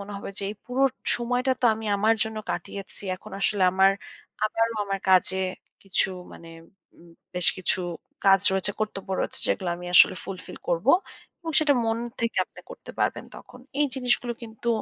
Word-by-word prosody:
মনে 200 +1 -7
হবে 200 - -6
যে, 200 - -2
"এই 210 - -6
পুরো 255 +2 0 0.3
সময়টা 245 +2 +1
তো - - -1
আমি 220 0 -7
আমার 220 +3 +4
জন্য 220 0 -6
কাটিয়েছি। 200 0 -5
এখন 215 +3 -13
আসলে 195 -1 +2
আমার 190 +1 +5 0.5
আবারও 225 +1 +1
আমার 195 0 -2
কাজে 190 0 +4 0.5
কিছু 195 0 +2 0.2
মানে 165 - -12 0.5
ম 170 - -17 0.3
বেশ 180 -1 +2
কিছু 185 +1 +1 0.5
কাজ 195 -1 +6
রয়েছে, 190 +1 +2
কর্তব্য 200 -3 -3
রয়েছে, - - -2
যেগুলো 185 -3 0
আমি 180 0 -8
আসলে 185 - +8
ফুলফিল 185 -2 -8
করব।" 175 +6 0 0.5
এবং 330 - -4
সেটা 290 -2 +4
মন 225 0 0 0.2
থেকে 230 0 -1
আপনি - - -15
করতে - - -10
পারবেন - - 0
তখন। 250 - -13 0.2
এই 295 - +5
জিনিসগুলো 245 -2 +1
কিন্তু 230 +1 -6
210 Hz, 170 wpm, -26 LUFS, 190-235 Hz, 0.5 s, আসলে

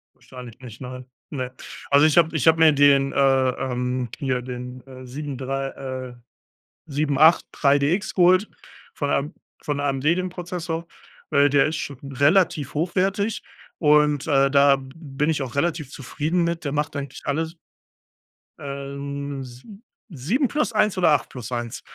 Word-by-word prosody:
Wahrscheinlich 125 -2 -12
nicht, 120 -3 -11
nein. 125 0 -8 0.2
Ne. 130 -4 -4 0.4
Also, 145 +2 +6
ich 155 - +2
habe 165 -1 +3
ich 145 - -1
habe 160 0 +6
mir 160 -1 +6
den, 140 -1 +4
äh, 135 -1 +3
ähm 125 -1 -3
hier 130 -3 -1
den, 125 +1 -8
äh, 130 -1 -11
7 140 +2 -6
3, 135 +1 -3
äh, 130 -2 -7 0.8
783DX 145 +2 +2
geholt 185 +3 +4 0.5
von 145 -1 -2
AM 145 +5 -1 0.3
von 145 -3 -2
AMD 140 -1 -1
den 180 +4 +2
Prozessor, 175 -2 -5 0.4
weil 145 -1 +4
der 140 0 +3
ist 155 - -2
schon 140 -3 -5
relativ 145 0 +2
hochwertig 195 +6 0 0.4
und, 150 -2 +3
äh, 140 -3 +3
da 140 0 +5
b 135 -1 -10
bin 150 -1 -2
ich 150 -3 -1
auch 130 - -6
relativ 150 -1 -1
zufrieden 155 +6 -2
mit. 170 -1 -2
Der 140 - -2
macht 150 +1 -2
eigentlich 140 -2 -6
alles. 160 +4 -2 1.0
Ähm, 140 0 -6
si 130 - -13 0.3
7 185 - 0
plus 300 -5 -1
1 210 -2 +2
oder 175 - +4
8 145 -3 +1
plus 125 -2 -8
1. 120 -2 -4
140 Hz, 155 wpm, -23 LUFS, 135-160 Hz, 1.0 s, Also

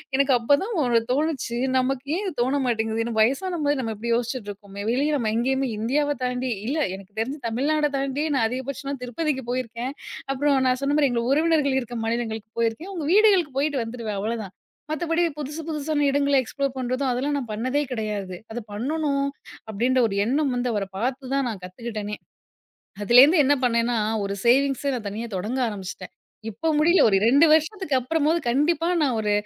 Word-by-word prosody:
எனக்கு 275 0 +3
அப் 230 - -11
அப்பதா 285 +8 +4 0.2
ஒண்ணு 240 -2 +3
தோணுச்சு, 280 -5 -1 0.2
நமக்கு 260 +1 0
ஏன் 410 - -3
இது 370 - -3
தோண 260 +4 +1
மாட்டேங்குது 225 -1 -1
வயசானமாரி 290 - +1
நம்ம 225 -3 -3
இப்படி 235 +3 -3
யோசிச்சிட்டு 240 -2 -3
இருக்கோமே, 200 0 -9
வெளிய 280 +5 +1
நம்ம 225 -5 -1
எங்கயுமே 265 +2 0
இந்தியாவ 290 +6 +1
தாண்டி 250 0 -2 0.2
இல்ல 295 +5 -1 0.2
எனக்கு 195 +1 -13
தெரிஞ்சு 270 +6 -3
தமிழ்நாட 295 +6 +1
தாண்டி 275 +2 -1
நான் 225 - +2
அதிகபட்சமா 275 +2 -4
திருப்பதிக்கு 265 +1 -2
போயிருக்கேன். 250 +1 -3 0.4
அப்புறம் 280 0 +2
நான் 255 +1 +1
சொன்ன 285 +1 +1
மாரி 280 -3 +4
எங்க 235 -1 0
உறவினர்கள் 300 -2 +2
இருக்க 240 -1 -6
மாநிலங்களுக்கு 225 -1 -3
போயிருக்கேன். 230 - -1
அவங்க 330 -5 -4
வீடுகளுக்கு 380 -10 +4
போயிட்டு 285 -4 0
வந்துடுவேன் 225 -4 -5
அவ்வளோதா. 215 -1 -3 0.4
மத்தப்படி 330 +2 0 0.2
புதுசு 300 +2 -5
புதுசான 300 -1 -1
இடங்கள்ல 280 0 +3
எக்ஸ்ப்ளோர் 275 +2 -3
பண்றதும், 255 +1 -1
அதெல்லா 260 +4 -1
நான் 245 -5 -5
பண்ணதே 255 +7 0
கிடையாது. 210 -5 -3 0.2
அத 240 - -4
பண்ணனும் 280 +4 -1 0.4
அப்படின்ற 245 +5 +1
ஒரு 195 - -4
எண்ணம் 275 +3 +1
வந்து 245 0 -1
அவர 200 -2 -1
பார்த்துதா 265 +2 -1
நான் 200 -5 -6
கத்துக்கிட்டனே. 210 +1 -5 0.9
அதுலேருந்து 275 - +7
என்ன 290 - +4
பண்ணேன்னா 235 0 +1 0.3
ஒரு 200 0 -3
சேவிங்ஸ 275 +2 +3
நான் 215 -4 -5
தனியா 225 +3 -5
தொடங்க 225 +8 -2
ஆரம்பிச்சுட்டேன். 195 -3 -7 0.4
இப்போ 235 +10 -3
முடியல. 340 +4 +4
ஒரு 195 - +3
2 280 +8 +6
வருஷத்துக்கு 320 0 +1
அப்புறமாவது 315 +5 +1
கண்டிப்பா 300 +7 +2 0.2
நான் 260 -5 +1
ஒரு 210 -1 0
255 Hz, 165 wpm, -24 LUFS, 230-290 Hz, 0.9 s, அதுலேருந்து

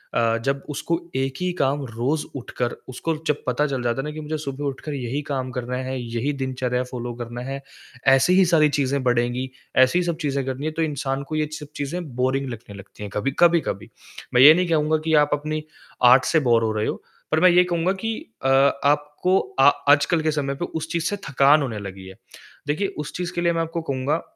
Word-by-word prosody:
अ, 115 -1 +2
जब 140 0 0
उसको 160 +3 -2 0.2
एक 135 0 0
ही 180 0 0
काम 140 +1 +1
रोज़ 125 +6 -2
उठकर 125 -2 -3 0.2
उसको 160 +6 -2
जब 150 - 0
पता 125 +4 +1
चल 135 -3 -3
जाता 120 +1 0
है - - -7
ना - - -4
कि 155 - -7
मुझे 155 +1 -3
सुबह 145 -1 -5
उठकर 140 +2 -4
यही 135 +1 -3
काम 130 -2 -2
करना 125 0 -4
है, 130 +1 -3
यही 120 +4 -2
दिनचर्या 130 -2 -2
फ़ॉलो 120 -1 -6
करना 120 +1 -6
है, 135 +1 -5 0.5
ऐसी 135 +6 +5
ही 190 - +7
सारी 160 -3 +4
चीज़ें 140 -1 0
बढ़ेगी, 125 +1 0 0.3
ऐसी 130 +7 +5
ही - - +1
सब 170 -2 -1
चीज़े 140 -2 -1
करनी 130 +2 -4
है 155 - -1
तो 160 - -3
इंसान 140 -3 -2
को 155 - -3
ये 155 -1 0
सब 150 - -9
चीज़ें 160 +6 -3
बोरिंग 130 +2 0
लगने 110 -3 -9
लगती 100 +1 -11
हैं 105 - -5
कभी 105 +6 -1
कभी-कभी। 170 - +2 0.4
मैं 125 - +5
ये 145 +4 +11
नहीं 180 +2 +1
कहूँगा 155 -1 +2
कि 160 - +1
आप 145 - -2
अपनी 155 +1 -2 0.4
आर्ट 125 +2 +7
से 160 - +3
बोर 120 -5 +3
हो 110 - +1
रहे 105 0 -1
हो - - -3 0.3
पर 155 - +3
मैं 185 - +7
ये 180 +1 +6
कहूँगा 175 0 0
कि 225 0 -1 0.3
अ, 135 - +2 0.4
आपको 150 +6 +2 0.2
अ, - - +6 0.3
आजकल 155 +3 +3
के 155 0 +1
समय 140 -2 -2
पे 175 - -3
उस 160 -1 -5
चीज़ 170 -1 -1
से 205 - -2
थकान 140 +3 +5
होने 115 -6 -3
लगी 95 -1 -8
है। 95 - -11 0.5
देखिए 155 +8 0
उस 150 - -5
चीज़ 175 -1 -4
के 175 - -1
लिए 170 0 +2
मैं 165 - 0
आपको 165 +1 -3
कहूँगा 140 +1 -1
140 Hz, 225 wpm, -23 LUFS, 125-155 Hz, 0.5 s, ये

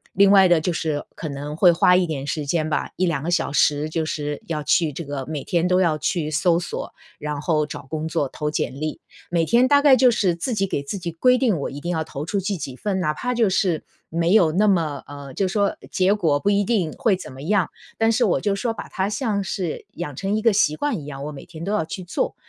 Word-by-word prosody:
另 200 +1 +6
外 195 -2 +7
的 170 -3 +4
就 180 - 0
是 155 -3 -2
可 160 - -5
能 145 +1 -6
会 180 +1 +6
花 180 +2 +4
一 180 0 +3
点 145 -4 -4
时 150 0 -2
间 155 +1 0
吧， 150 - -2
1-2 170 -6 0
个 175 - -2
小 175 - +1
时 145 +1 +2
就 160 0 -1
是 150 -2 -4
要 155 -2 -2
去 150 +1 +2
这 170 - -5
个 140 -3 -5
每 150 -1 -5
天 175 -1 +1
都 180 +1 +3
要 165 -4 +2
去 155 0 -1
搜 170 +2 +2
索， 175 - -5 0.2
然 150 -1 -4
后 155 -1 +1
找 140 -2 -8
工 155 +1 -3
作、 145 -3 -1
投 150 -1 -3
简 135 -3 -2
历。 155 0 -4 0.3
每 170 -1 +2
天 235 +8 +4
大 285 +1 +5
概 285 -2 +7
就 255 -1 +5
是 190 -7 +1
自 240 +9 -3
己 195 -2 0
给 140 - -2
自 190 +7 -5
己 170 -1 -4
规 250 +10 +3
定， 230 -9 +2
我 - - -2
一 140 - -7
定 170 - -4
要 160 -2 -1
投 150 -2 -6
出 200 +2 0
去 195 +1 -2
几 135 -5 -6
份。 190 +5 -2
哪 150 -4 +1
怕 250 +10 -3
就 230 -4 +2
是 180 -4 +1 0.3
没 170 +2 +1
有 175 -7 +5
那 200 +6 +2
么， 160 -8 +1
呃 140 -1 -9
就 190 +7 0
说 200 +1 0
结 190 +1 +2
果 160 -9 +1
不 205 - +1
一 205 0 +3
定 195 -7 0
会 220 -5 +2
怎 180 - -9
么 130 - -10
样， 185 +2 +1 0.3
但 225 0 +3
是 - - +2
我 - - +2
就 205 - 0
说 230 +4 -1
把 225 - -7
它 190 +1 -1
像 210 -3 -1
是 185 -4 -4
养 150 -5 -6
成 195 +7 -1
一 215 - -3
个 230 -2 +4
习 155 -6 +3
惯 270 - -1
一 145 - -9
样， 140 -1 -7
我 150 - -4
每 140 - -9
天 165 -1 -9
都 195 - -2
要 210 -5 +1
去 185 +4 -6
做 175 - -2
170 Hz, 280 characters per minute, -22 LUFS, 150-200 Hz, 0.3 s, 外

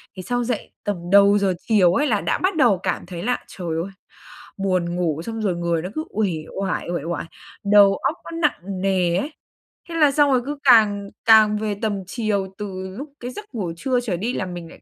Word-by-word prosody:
Thì 185 - -7
sau 245 +4 -1
dậy 240 -2 -3
tầm 205 -1 -1 0.2
đầu 200 +1 +6
giờ 195 -2 +1
chiều 190 -6 +4
ấy, 290 +9 +2
là 210 -4 +1
đã - - 0
bắt 375 0 0
đầu 235 - +4
cảm - - -2
thấy 175 -1 -7
là, 250 +3 0
trời 180 -3 -8 0.2
ơi, 195 - -8 0.7
buồn 185 -3 0
ngủ, 165 -4 -1
xong 225 -1 -4
rồi 195 -5 0
người 170 -1 -1
nó 180 - -5
cứ 310 - -2
uể 210 -2 0 0.3
oải, 190 -3 -2
uể 170 -5 -2
oải, 170 +1 -3 0.4
đầu 200 -1 +6
óc 305 - -1 0.2
nó 330 - -5
nặng 195 - -1
nề 185 -3 +1
ấy. 285 +11 -2 0.6
Thế 335 - -5
là 300 -3 +5
xong 290 0 +3
rồi 255 -2 +3
cứ 290 +1 -4
càng 210 -6 +5 0.2
càng 215 -1 +6
về 210 -1 -2
tầm 205 -3 -1
chiều 205 -3 -1
từ 190 -2 -6
lúc 280 +1 -8
cái 245 +1 -6
giấc 420 - -8
ngủ 190 -7 -2
trưa 255 +6 0
trở 220 -8 -2
đi 225 +8 -2
là 190 - -2
mình 175 -2 -7
lại - - -15
205 Hz, 225 wpm, -22 LUFS, 185-245 Hz, 0.7 s, đầu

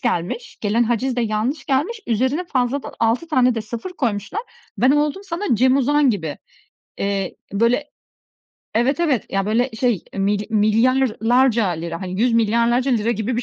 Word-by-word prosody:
gelmiş. 240 - -3
Gelen 220 +3 +1
haciz 240 +2 -1
de - - +1
yanlış 225 +7 -1
gelmiş. 300 - 0
Üzerine 260 +9 0
fazladan 260 -3 -1
6 230 +9 +1
tane 255 -5 +3
de 225 - -2
0 235 +10 -6
koymuşlar. 240 - -2 0.4
Ben 255 +4 +4
oldum 295 +6 +1
sana 365 +1 -4
Cem 260 +3 +4
Uzan 280 0 +3
gibi, 160 -8 -4 0.6
eee, 195 -1 -2 0.2
böyle, 235 +7 +1 0.9
evet, 255 +8 +1
evet, 290 - +1
ya, 195 0 -1
böyle 240 +5 +1
şey, 225 -5 0
milya 200 +1 0
milyarlarca 230 +1 +3
lira, 170 -1 -4
hani, 185 +1 -4
100 245 +1 +3
milyarlarca 235 +3 +2
lira 230 -2 +1
gibi 225 +2 -2
bir 245 - -1
240 Hz, 155 wpm, -21 LUFS, 215-265 Hz, 0.9 s, Ben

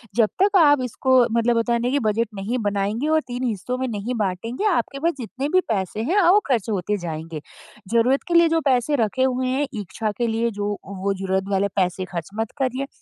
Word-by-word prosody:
जब 225 -3 +4
तक 400 0 +4
आप 290 -5 +5
इसको 260 +2 0 0.2
मतलब 235 0 +2
होता 230 +1 +1
है 235 - +1
ना 245 - +1
कि 285 - +2
बजट 225 +2 +1
नहीं 200 +6 -2
बनाएँगे 205 +7 -1
और 315 0 +3
3 245 +1 -4
हिस्सों 245 +1 -2
में 260 - -1
नहीं 225 +3 -3
बाँटेंगे, 220 - -2
आपके 285 -6 -1
पास 335 +4 +1
जितने 260 +4 -4
भी 370 +3 +4
पैसे 200 -1 -1
हैं 405 +2 +4
वो 400 +4 +6
ख़र्च 235 -5 0
होते 205 0 -1
जाएँगे। 160 -1 -5 0.5
ज़रूरत 245 +4 +3
के - - 0
लिए 340 0 +7
जो 325 0 +2
पैसे 260 +2 +2
रखे 240 +5 0
हुए 255 0 0
हैं, 265 +3 0
इच्छा 215 0 -3
के 240 - 0
लिए 230 +1 0
जो 205 0 -1
वो 200 0 -2
ज़रूरत 190 0 -1
वाले 195 +1 +2
पैसे 185 -1 0
ख़र्च 170 -3 -6
मत 225 -1 -2
करिए 265 +1 -1
235 Hz, 215 wpm, -22 LUFS, 200-260 Hz, 0.5 s, लिए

